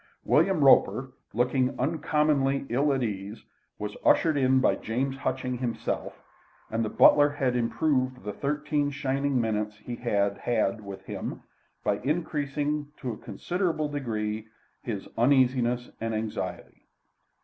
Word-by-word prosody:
William 190 -6 +3
Roper, 130 -1 +5 0.2
looking 125 +2 +1
uncommonly 145 -1 +1
ill 140 +5 +2
at 135 -2 0
ease, 105 0 -5 0.3
was 105 0 -5
ushered 160 -2 +4
in 130 -1 +4
by - - +3
James 130 +4 -2
Hutchings 130 -2 -2
himself, 120 -3 -3 0.5
and 115 +1 0
the 110 - -1
butler 145 +6 +6
had 135 -4 -1
improved 130 +1 0
the 105 0 -4
thirteen 150 +2 -1
shining 140 -1 0
minutes 105 -2 -1
he 120 +3 -6
had 100 -4 0
had 110 -2 0
with 100 -1 -8
him - - -5 0.4
by 100 - +1
increasing 150 -1 -1
to 125 - -4
a 110 - -6
considerable 170 - -2
degree 110 -6 -3 0.3
his 105 -5 -5
uneasiness 125 -1 +3
and 115 -1 -1
anxiety. 110 0 -5
130 Hz, 130 wpm, -27 LUFS, 115-145 Hz, 0.5 s, butler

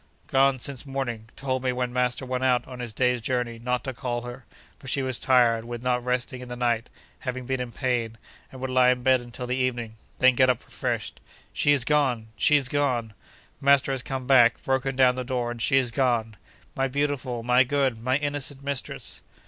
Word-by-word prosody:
'Gone 135 0 +3
since 135 0 -3
morning—told 130 -1 -4
me, 130 0 0
when 125 -1 -2
master 125 +1 0
went 130 0 -2
out 125 -2 +2
on 125 -1 -9
his 120 -2 -4
day's 125 +1 +1
journey, 120 -1 -2
not 125 +1 -1
to 130 - -4
call 120 -1 -3
her, 125 +1 -9 0.3
for 135 - -13
she 135 +2 0
was 130 -2 -2
tired 120 -3 +3
with 120 0 -7
not 125 -1 0
resting 125 0 -2
in 125 - -9
the 125 - -5
night 120 -1 0 0.3
(having 130 -1 -4
been 130 0 -2
in 125 -1 -5
pain), 115 -2 -2 0.3
and 130 - -10
would 130 0 -3
lie 130 0 +5
in 125 -1 +1
bed 130 -1 +4
until 120 +1 -7
the 125 +1 -1
evening; 120 -3 -2 0.2
then 130 0 +5
get 130 +1 +4
up 125 - 0
refreshed. - - -3 0.3
She 145 - +2
is 140 -4 +3
gone!—she 130 -3 +2
is 140 -3 +3
gone! 125 -6 0 0.5
Master 140 0 +4
has 135 -1 -1
come 130 -1 -5
back, 120 -3 +5
broken 135 0 0
down 130 -1 +5
the 130 0 -4
door, 125 -2 -2
and 120 -1 -7
she 135 +4 +3
is 125 -3 +2
gone! 120 -4 0 0.4
My 135 0 +1
beautiful, 135 -3 -2
my 125 +2 +5
good, 135 -3 0
my 130 +3 +1
innocent 145 -1 -3
mistress! 140 -2 -4
125 Hz, 205 wpm, -26 LUFS, 120-135 Hz, 0.5 s, lie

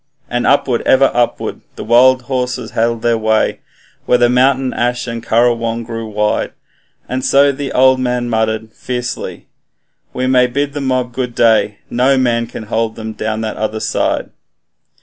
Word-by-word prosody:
And 120 0 0
upward, 130 -3 +2
ever 135 +1 +4
upward, 120 -1 -1
the - - -7
wild 125 +3 +4
horses 125 -2 -3
held 115 0 -1
their 115 -1 +2
way, 110 0 +1 0.5
Where 120 -1 +4
mountain 130 +1 +2
ash 120 0 -1
and 115 -1 -5
kurrajong 115 0 +1
grew 115 -1 -6
wide; 105 0 -1 0.5
And 130 +1 -2
the 140 0 +2
old 130 0 +5
man 125 -1 -1
muttered 110 -1 -1
fiercely, 125 0 -5 0.7
'We 130 - -2
may 130 -1 +4
bid 140 +3 -2
the 145 - -4
mob 130 -2 -1
good 125 -1 -3
day, 110 -2 +3
NO 130 +3 +3
man 120 -2 +1
can 115 - -8
hold 110 +1 -2
them 110 0 -6
down 110 0 -3
the 110 - -2
other 110 0 -3
side.' - - -1
120 Hz, 155 wpm, -16 LUFS, 115-130 Hz, 0.7 s, old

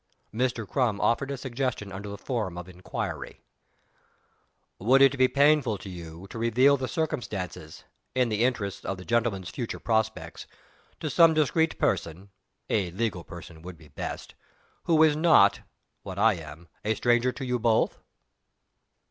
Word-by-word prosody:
Mr. 115 -2 -1
Crum 115 -5 0
offered 135 +4 +1
a 140 - -3
suggestion 130 -5 -3
under 100 +2 -7
the 100 - -6
form 105 -6 -3
of 90 0 -7
an 90 -1 -13
inquiry: 90 - -5 1.4
"Would 125 +7 +4
it 135 0 +6
be 130 -1 +4
painful 140 -5 +3
to 95 - -9
you 85 0 -9
to 115 - -6
reveal 125 +5 +4
the 130 -2 -3
circumstances 100 - -4 0.3
in 125 -2 +2
the 110 +1 +1
interests 105 -6 -1
of 95 - -3
the 90 - -10
gentleman's 115 -6 0
future 120 -3 -5
prospects 110 -1 -2 0.5
to 155 - -2
some 165 0 +6
discreet 160 +2 +2
person 90 +5 -1 0.4
(a 100 -5 0
legal 95 -1 -2
person 85 -1 -11
would 90 0 -9
be 75 -1 -17
best) 70 - -6 0.5
who 160 -2 +5
is 155 -2 +4
not, 160 +2 +5 0.4
what 95 - -8
I 110 +2 +4
am, 80 -1 -10 0.2
a 110 +1 0
stranger 120 +2 +2
to 135 - -6
you 125 -1 -1
both?" 115 -1 +2
115 Hz, 155 wpm, -27 LUFS, 95-130 Hz, 1.4 s, it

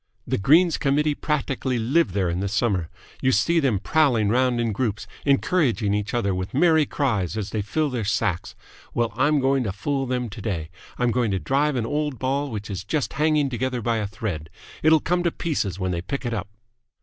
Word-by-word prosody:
The - - -1
Greens 160 - +4
Committee 150 +2 +2
practically 135 -4 -1
live 120 - +2
there 95 -2 +1
in 85 +1 -1
the 100 - -1
summer. 100 -4 0 0.3
You 130 - +3
see 170 +6 +3
them 135 -9 +2
prowling 120 -3 +2
round 125 +1 +2
in 115 -1 0
groups, 105 -1 -2 0.2
encouraging 135 - +2
each 105 +2 -2
other 100 -5 +1
with 95 +5 -4
merry 160 -1 +4
cries 110 - -1
as 105 -2 -3
they 110 - -1
fill 150 +8 -1
their 120 -3 -2
sacks. 100 -3 -1 0.4
Well, 115 -2 0
I'm 145 +4 +3
going 135 0 +2
to 105 - -2
fool 135 +7 -2
them 125 -1 -1
today. 100 -7 -4 0.3
I'm 125 -1 +1
going 120 -1 +1
to 95 -1 0
drive 140 +6 +1
an 120 -3 -1
old 150 +1 -2
ball 140 +3 -1
which 105 -3 -5
is 95 - -4
just 150 -3 -2
hanging 150 -1 +2
together 130 0 -2
by 115 0 0
a 105 -2 -1
thread. 100 -7 -5 0.3
It'll 160 0 +5
come 175 +4 0
to 175 - +2
pieces 125 - -2
when 95 -1 -2
they 85 -1 -2
pick 135 +9 -4
it 120 - -1
up!" 105 - -3
125 Hz, 205 wpm, -24 LUFS, 105-145 Hz, 0.4 s, It'll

